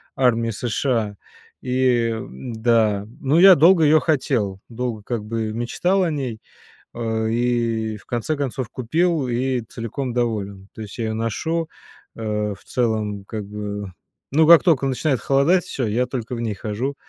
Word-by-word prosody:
армии 115 -3 +2
США, 115 -1 -1 0.5
и, 125 -2 +2
м-да, 110 -2 0
ну, 145 +4 +3
я 190 +1 +9
долго 165 +2 +6
её 155 +1 +6
хотел, 125 - 0
долго, 120 -2 -4
как 115 -1 -3
бы, 110 0 -3
мечтал 175 - 0
о 175 - +1
ней, 130 -7 -4 0.5
а, 110 -1 -2
и 115 -2 0
в 100 - -19
конце 120 +6 -2
концов 130 -3 -3
купил 160 +4 0
и 125 +1 0
целиком 115 +3 -5
доволен. 100 -5 -2
То - - -8
есть 105 +3 -8
я 115 - -1
её 110 - -2
ношу, 160 +9 -2 0.5
а, 105 -2 -2
в - - -21
целом, 110 -4 -1
как 105 0 -5
бы, 105 -1 -5 0.4
ну, 155 +3 +4
как 170 0 +9
только 155 -7 +3
начинает 130 0 0
холодать, 140 - +2
всё, 125 -5 -3
я 120 +4 +1
только 125 -1 -4
в 115 - -4
ней 115 -2 -1
хожу. 110 +7 -3
120 Hz, 160 wpm, -22 LUFS, 110-135 Hz, 0.5 s, я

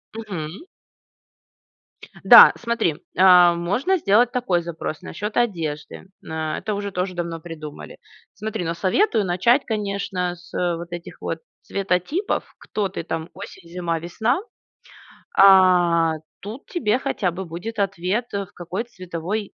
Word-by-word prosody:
Мгм. 195 - -6 1.6
Да, - - +10
смотри. 230 -9 0 0.2
А, 180 -1 +7
можно 205 - 0
сделать 235 - +3
такой 195 -9 0
запрос, 165 -2 -5
насчет 210 +5 -5
одежды. 165 -12 -2 0.2
М, - - -10
а, 155 -1 -2
это 215 - -3
уже 200 0 -4
тоже 185 0 -2
давно 170 -1 -4
придумали. 155 -2 -9 0.4
Смотри, 215 -3 -4
но 165 - -1
советую 215 - +1
начать, 210 +10 +2
конечно, 200 -4 -2
с, 175 +1 -18
э, 175 -1 0
вот 170 +1 -9
этих 175 0 -8
вот - - -3 0.2
цветотипов. 195 - -1 0.2
Кто 210 -2 -2
ты 180 - -5
там, 160 0 -4
осень, 190 -2 -11
зима, 170 -1 -2
весна. 220 - 0 1.0
А, 180 -4 +6 0.3
тут 220 +7 -8
тебе 250 - 0
хотя 185 -8 -1
бы 190 +3 -6
будет 180 +7 -6
ответ, 195 +3 -1
э, 200 -1 -2
в 200 - -24
какой 180 +5 -4
цветовой 185 -1 -5
185 Hz, 140 wpm, -22 LUFS, 170-210 Hz, 1.6 s, Да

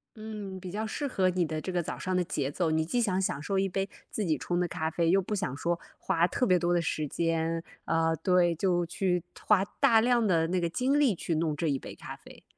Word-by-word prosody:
嗯， 210 -3 -7
比 185 -1 -7
较 215 +3 -2
适 285 +6 -3
合 190 -8 +2
你 180 -1 +1
的 155 0 -3
这 185 - -4
个 175 -1 0
早 - - -5
上 185 0 -2
的 180 - +2
节 145 -5 -2
奏。 165 +1 0
你 160 0 +2
既 245 +9 0
想 190 -4 +1
享 145 -6 -1
受 190 +6 0
一 195 0 +1
杯 195 +1 -1 0.2
自 215 - -2
己 160 -3 +1
冲 175 0 -2
的 180 - +1
咖 160 -1 -2
啡， 165 0 +1
又 195 +1 +4
不 210 +3 -3
想 185 -9 -2
说， 170 +4 -1 0.2
花 165 +1 +2
特 250 - 0
别 185 - +5
多 175 0 +1
的 175 - +2
时 155 -2 -2
间， 165 +1 -1 0.2
呃， 165 0 +2
对， 175 0 +2
就 175 0 +1
去 180 0 -1 0.2
花 205 -3 +3 0.2
大 225 -1 +5
量 240 -1 +3
的 165 -5 +2
那 180 +2 0
个 170 - 0
精 260 - +1
力 265 -9 +3
去 165 0 -2
弄 155 -1 0
这 165 +2 -1
1 140 -3 +1
杯 - - -9
咖 - - -8
啡。 - - -16
180 Hz, 265 characters per minute, -29 LUFS, 165-195 Hz, 0.2 s, 别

